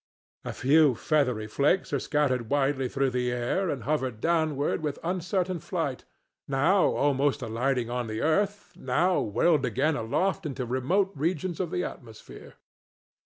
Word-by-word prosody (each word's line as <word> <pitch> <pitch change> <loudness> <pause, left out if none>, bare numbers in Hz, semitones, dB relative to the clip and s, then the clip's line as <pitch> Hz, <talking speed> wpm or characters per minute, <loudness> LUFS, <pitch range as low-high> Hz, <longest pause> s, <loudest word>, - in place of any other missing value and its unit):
A - - -4
few 145 0 +4
feathery 125 -6 0
flakes 140 - +1
are 140 - +2
scattered 130 -6 0
widely 135 -2 +1
through 135 0 0
the 125 0 -1
air 125 +10 -1
and 130 -7 -3
hover 130 0 0
downward 150 +5 0
with 150 -2 -3
uncertain 180 +1 -1
flight, - - -3 0.4
now 160 +8 +3
almost 140 0 +1
alighting 120 +1 -1
on 125 -1 -2
the 110 0 -4
earth, 200 +6 0
now 175 +8 +1
whirled 140 +8 +2
again 135 +6 +1
aloft 160 +10 -1
into 130 -3 -4
remote 140 - 0
regions 170 +3 -2
of 180 -3 -1
the 180 - -2
atmosphere. 115 -10 -10
140 Hz, 145 wpm, -27 LUFS, 125-170 Hz, 0.4 s, few